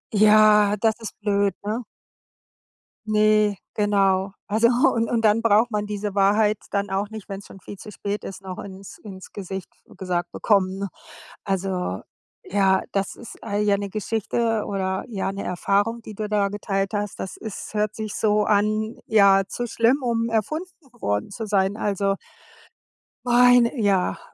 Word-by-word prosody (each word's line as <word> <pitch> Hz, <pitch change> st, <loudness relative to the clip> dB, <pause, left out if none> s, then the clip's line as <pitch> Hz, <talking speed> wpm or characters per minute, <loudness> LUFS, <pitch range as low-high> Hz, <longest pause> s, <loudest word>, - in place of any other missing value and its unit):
Ja, 210 Hz, 0 st, +6 dB
das 220 Hz, -1 st, +3 dB
ist 225 Hz, -, -8 dB
blöd, 200 Hz, -2 st, +1 dB
ne? 220 Hz, +4 st, -2 dB, 1.2 s
Ne, 215 Hz, -1 st, +3 dB, 0.2 s
genau. 195 Hz, -2 st, +2 dB, 0.2 s
Also 220 Hz, +3 st, +3 dB
und 235 Hz, -2 st, +2 dB
und 230 Hz, -2 st, +1 dB
dann 215 Hz, +1 st, +4 dB
braucht 225 Hz, +1 st, +3 dB
man 210 Hz, 0 st, -1 dB
diese 205 Hz, -1 st, -4 dB
Wahrheit 210 Hz, +1 st, +3 dB
dann 200 Hz, -1 st, -1 dB
auch 195 Hz, +2 st, -1 dB
nicht, 220 Hz, -2 st, -9 dB
wenn's 195 Hz, 0 st, -7 dB
schon 195 Hz, -, -13 dB
viel 200 Hz, -, -10 dB
zu 210 Hz, -, -10 dB
spät 205 Hz, +1 st, -4 dB
ist, 195 Hz, -, -8 dB
noch 185 Hz, -1 st, -7 dB
ins 195 Hz, 0 st, -9 dB
ins 190 Hz, -3 st, -11 dB
Gesicht 190 Hz, -2 st, -6 dB, 0.2 s
f -, -, -18 dB
gesagt 175 Hz, -2 st, -2 dB
bekommen, 195 Hz, -3 st, +1 dB
ne? 200 Hz, -, -2 dB, 0.6 s
Also, 185 Hz, -, -2 dB, 0.4 s
ja, 195 Hz, -1 st, +2 dB
das 195 Hz, -1 st, -2 dB
ist 235 Hz, -, -12 dB
all 205 Hz, -1 st, -2 dB
ja, 205 Hz, -1 st, +3 dB
'ne 200 Hz, 0 st, -4 dB
Geschichte 220 Hz, +1 st, -1 dB
oder, 190 Hz, -1 st, -2 dB
ja, 195 Hz, -4 st, -3 dB
'ne 195 Hz, -, -5 dB
Erfahrung, 205 Hz, +6 st, 0 dB
die 215 Hz, -, -9 dB
du 210 Hz, +1 st, -4 dB
da 205 Hz, -1 st, +1 dB
geteilt 195 Hz, 0 st, -2 dB
hast. 205 Hz, 0 st, -3 dB
Das 190 Hz, -, -6 dB
ist 220 Hz, 0 st, -7 dB
hört 210 Hz, 0 st, -1 dB
sich 215 Hz, -1 st, -5 dB
so 210 Hz, -1 st, +2 dB
an 215 Hz, +2 st, +1 dB
ja, 200 Hz, -2 st, +5 dB
zu 240 Hz, -, -4 dB
schlimm, 235 Hz, +4 st, +2 dB
um 230 Hz, -1 st, 0 dB
erfunden 305 Hz, -, -1 dB, 0.3 s
worden 105 Hz, -, -1 dB
zu 225 Hz, +1 st, -5 dB
sein. 200 Hz, 0 st, +1 dB
Also 200 Hz, -2 st, 0 dB, 1.1 s
meine 245 Hz, -1 st, +5 dB
ja, 195 Hz, -3 st, +1 dB
205 Hz, 165 wpm, -23 LUFS, 195-220 Hz, 1.2 s, Ja